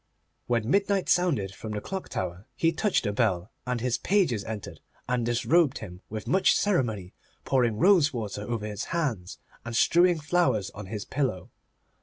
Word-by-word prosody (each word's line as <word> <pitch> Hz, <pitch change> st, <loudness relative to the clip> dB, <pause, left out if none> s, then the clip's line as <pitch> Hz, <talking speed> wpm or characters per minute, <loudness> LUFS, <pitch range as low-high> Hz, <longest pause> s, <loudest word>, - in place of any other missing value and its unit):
When 115 Hz, -2 st, 0 dB
midnight 195 Hz, +4 st, +1 dB
sounded 140 Hz, -, +2 dB
from 110 Hz, +2 st, -7 dB
the 105 Hz, -, -2 dB
clock 190 Hz, -, -6 dB
tower 90 Hz, +3 st, -4 dB
he 165 Hz, +6 st, +2 dB
touched 180 Hz, -, 0 dB
a 105 Hz, -, 0 dB
bell, 100 Hz, -4 st, 0 dB, 0.2 s
and 125 Hz, -1 st, -1 dB
his 125 Hz, -1 st, 0 dB
pages 170 Hz, -, +1 dB
entered 110 Hz, -2 st, -7 dB, 0.3 s
and 125 Hz, -1 st, 0 dB
disrobed 130 Hz, +6 st, +2 dB
him 90 Hz, -4 st, -9 dB
with 110 Hz, 0 st, -6 dB
much 190 Hz, +1 st, +4 dB
ceremony, 115 Hz, -, 0 dB, 0.3 s
pouring 120 Hz, -5 st, +2 dB
rose 170 Hz, -, +5 dB
water 105 Hz, -5 st, -4 dB
over 110 Hz, 0 st, -3 dB
his 105 Hz, -1 st, -4 dB
hands, 130 Hz, -, -2 dB, 0.3 s
and 115 Hz, 0 st, -5 dB
strewing 175 Hz, +6 st, +4 dB
flowers 145 Hz, -, +1 dB
on 105 Hz, -1 st, -9 dB
his 105 Hz, 0 st, -5 dB
pillow. 130 Hz, -, -2 dB
120 Hz, 165 wpm, -27 LUFS, 105-170 Hz, 0.3 s, rose